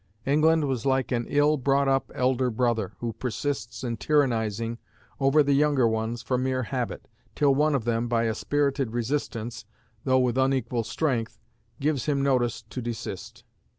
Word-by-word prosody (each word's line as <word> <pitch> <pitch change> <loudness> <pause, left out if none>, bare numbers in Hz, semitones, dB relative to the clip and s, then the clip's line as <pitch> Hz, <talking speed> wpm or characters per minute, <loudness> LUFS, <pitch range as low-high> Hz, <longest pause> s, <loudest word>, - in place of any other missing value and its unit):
England 155 +2 +3
was 130 -4 -2
like 135 -1 +1
an 120 -1 -1
ill 145 +1 +3
brought 140 +1 +2
up 135 0 +1
elder 130 0 +1
brother, 115 -4 0
who 115 -1 -2
persists 125 -1 -4
in 120 -2 -2
tyrannizing 115 -3 0 0.4
over 140 +2 +4
the 140 0 +2
younger 140 -3 +3
ones 110 +2 -2
from 125 -1 0
mere 130 0 0
habit, 125 0 -4 0.3
till 145 -2 +4
one 150 +2 +2
of 120 -5 -1
them, 120 0 0
by 115 -1 +1
a 110 -1 +1
spirited 140 -1 0
resistance, 120 -2 -3 0.4
though 130 -1 +3
with 125 0 +1
unequal 130 -3 +1
strength, 115 -2 -2 0.4
gives 145 -1 0
him 140 -2 +1
notice 125 -5 +1
to 120 +3 -7
desist. 115 -5 -6
130 Hz, 160 wpm, -26 LUFS, 115-140 Hz, 0.4 s, over